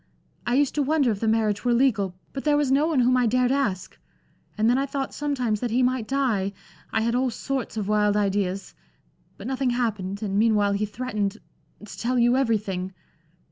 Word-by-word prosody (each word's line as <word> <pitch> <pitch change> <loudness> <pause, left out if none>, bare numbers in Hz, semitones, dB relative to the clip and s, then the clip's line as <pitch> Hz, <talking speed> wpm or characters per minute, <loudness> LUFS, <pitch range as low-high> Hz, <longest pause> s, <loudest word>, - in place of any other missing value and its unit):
I 240 - +2
used 285 0 +2
to 295 - 0
wonder 280 -3 +2
if 205 - -3
the 225 - -1
marriage 220 -2 +1
were 245 -1 +2
legal, 220 -8 +1 0.2
but 270 - -5
there 295 -1 +3
was 290 -3 +1
no 285 +3 +3
one 305 -6 +2
whom 250 +1 +3
I 250 -2 +3
dared 250 +2 +2
ask. 210 -10 -1 0.6
And 215 +1 +2
then 245 +3 +3
I 275 - -1
thought 275 -1 -3
sometimes 255 -7 -1
that 245 - -2
he 245 +3 +2
might 250 -3 0
die 230 -8 0 0.4
I 225 - +1
had 230 +1 0
all 255 +1 +1
sorts 255 0 -4
of 205 -3 -2
wild 210 -1 +2
ideas; 195 -1 -1 0.6
but - - -10
nothing 265 0 -1
happened, 210 -5 -2
and 200 -1 0
meanwhile 210 -2 +3
he 205 +1 0
threatened 210 -3 -3 0.5
to - - -10
tell 250 +2 0
you 240 +1 +4
everything. 200 -7 -1
235 Hz, 200 wpm, -25 LUFS, 210-260 Hz, 0.6 s, you